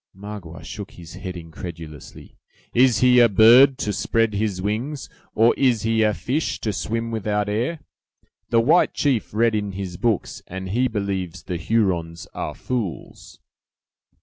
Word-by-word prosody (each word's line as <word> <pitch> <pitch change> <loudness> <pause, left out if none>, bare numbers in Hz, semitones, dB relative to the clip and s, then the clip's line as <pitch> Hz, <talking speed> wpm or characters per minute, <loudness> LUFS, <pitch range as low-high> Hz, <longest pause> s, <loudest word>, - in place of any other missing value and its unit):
Magua 100 -5 -9
shook 105 -2 -7
his 85 0 -12
head 95 -1 -7
incredulously. 80 -2 -10 0.4
"Is 125 -2 +4
he 125 -1 +6
a 120 -1 +6
bird, 120 +6 +7
to 105 -7 -2
spread 115 0 +1
his 100 -2 -1
wings; 115 +9 -3 0.3
or 115 +2 +5
is 125 -6 +2
he 115 0 +1
a 110 -1 +4
fish, 125 - -2
to 105 - -1
swim 115 +3 -3
without 105 -2 -1
air! 120 +10 -2 0.7
The 115 -1 +4
white 160 +9 +3
chief 135 -7 0
read 115 +2 +2
in 105 -2 -2
his 95 -2 -5
books, 115 -2 -1
and 95 +1 -6
he 125 +6 +1
believes 95 -5 -3
the 90 - -4
Hurons 85 -3 -1
are - - -4
fools!" 115 - -5
105 Hz, 150 wpm, -22 LUFS, 95-115 Hz, 0.7 s, bird